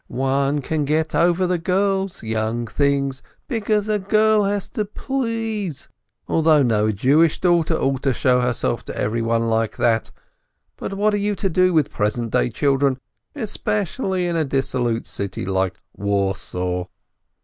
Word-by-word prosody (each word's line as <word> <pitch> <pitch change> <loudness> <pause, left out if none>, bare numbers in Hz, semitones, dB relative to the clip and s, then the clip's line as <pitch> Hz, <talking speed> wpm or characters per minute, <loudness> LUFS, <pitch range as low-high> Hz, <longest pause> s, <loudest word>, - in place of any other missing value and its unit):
"One 135 +2 0
can 155 +2 -1
get 155 +2 0
over 170 +4 +3
the 180 -1 0
girls, 190 0 0
young 110 +1 -1
things, 140 +2 0 0.3
because 215 -4 0
a 210 -1 +1
girl 215 +1 +3
has 200 -1 -1
got - - -31
to - - 0
please, 225 - -3 0.4
although 155 -2 +4
no 110 -3 +2
Jewish 145 +10 +3
daughter 170 -2 +2
ought 135 -3 0
to 135 - +2
show 125 0 +2
herself 125 -2 -1
to - - -7
everyone 115 +1 0
like 115 -1 0
that, 115 -1 +1 0.7
but 195 - -5
what 210 +2 +2
are - - +2
you 205 0 0
to 195 - -1
do 185 +2 +3
with 155 -3 +2
present 110 +1 -1
day - - +2
children, 135 +2 +1 0.4
especially 205 - -1
in 175 -1 -1
a 160 - +2
dissolute 130 -4 -1
city 100 -1 -4
like 95 -1 -1
Warsaw? 95 -3 -1
145 Hz, 150 wpm, -21 LUFS, 115-195 Hz, 0.7 s, although